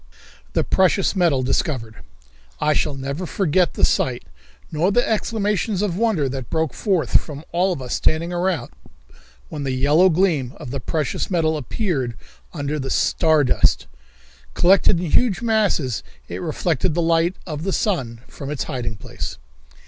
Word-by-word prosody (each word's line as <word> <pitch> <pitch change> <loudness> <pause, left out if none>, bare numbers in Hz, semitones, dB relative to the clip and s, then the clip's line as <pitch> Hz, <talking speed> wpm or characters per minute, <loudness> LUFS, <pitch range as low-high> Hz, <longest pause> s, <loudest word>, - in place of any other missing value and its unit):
The - - +2
Precious 190 +2 +2
Metal 165 -8 +2
Discovered. 125 - -1 0.6
I 150 - +2
shall 145 - 0
never 140 +6 -4
forget 180 -1 +1
the - - +4
sight, 125 -2 0 0.5
nor 165 +5 +1
the 245 +4 +2
exclamations 210 -2 0
of 190 -5 -1
wonder 205 -9 +1
that 130 -2 -5
broke 160 -2 0
forth 180 - +2
from 150 0 -9
all 180 +3 +2
of 145 -7 -4
us 125 - -4
standing 165 +3 0
around, 175 -7 -1 0.8
when 150 - -5
the 135 - -2
yellow 145 +8 +4
gleam 160 -8 +1
of 120 - -8
the 140 - -3
precious 150 +3 -2
metal 160 -4 +1
appeared 145 - -2 0.4
under 145 +1 -3
the 135 -1 -4
"star 160 +2 +3
dust." 125 - +2 0.7
Collected 185 0 +4
in 175 -3 -3
huge 235 -5 +2
masses 205 - +1 0.3
it - - -6
reflected 165 0 -1
the 170 - +1
light 165 +2 +2
of 155 -4 -5
the 195 +4 -2
sun 130 - -1
from 140 - -8
its 145 -5 -2
hiding 125 -6 -4
place. - - -6
160 Hz, 155 wpm, -21 LUFS, 140-185 Hz, 0.8 s, the